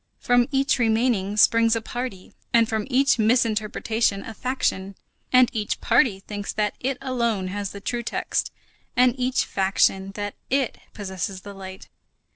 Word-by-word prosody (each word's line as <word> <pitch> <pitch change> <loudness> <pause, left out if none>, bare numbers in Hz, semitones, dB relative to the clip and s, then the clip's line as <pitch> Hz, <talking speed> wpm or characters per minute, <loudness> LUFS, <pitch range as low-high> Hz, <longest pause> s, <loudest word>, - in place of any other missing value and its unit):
From 245 -1 +3
each 275 -1 +1
remaining 220 -3 +1
springs 230 +1 +5
a - - 0
party, 240 -4 -6 0.2
and 230 -1 +4
from 220 -1 -2
each 270 -1 +3
misinterpretation 220 -2 +1
a 225 - -8
faction; 200 -6 -2 0.4
and 255 -1 +6
each 210 -2 -2
party 230 -4 +3
thinks 205 0 -5
that 210 -1 0
it 265 +1 -2
alone 235 -8 -1
has 200 0 -3
the 200 - -9
true 240 +4 -2
text, 235 - -2 0.4
and 250 -1 +5
each 255 0 0
faction 190 0 +1
thinks 195 +1 -10
that 205 -1 -4 0.2
it 270 -2 0 0.2
possesses 190 -1 -5
the 200 +1 -9
light. 190 -1 -10
220 Hz, 155 wpm, -24 LUFS, 200-245 Hz, 0.4 s, and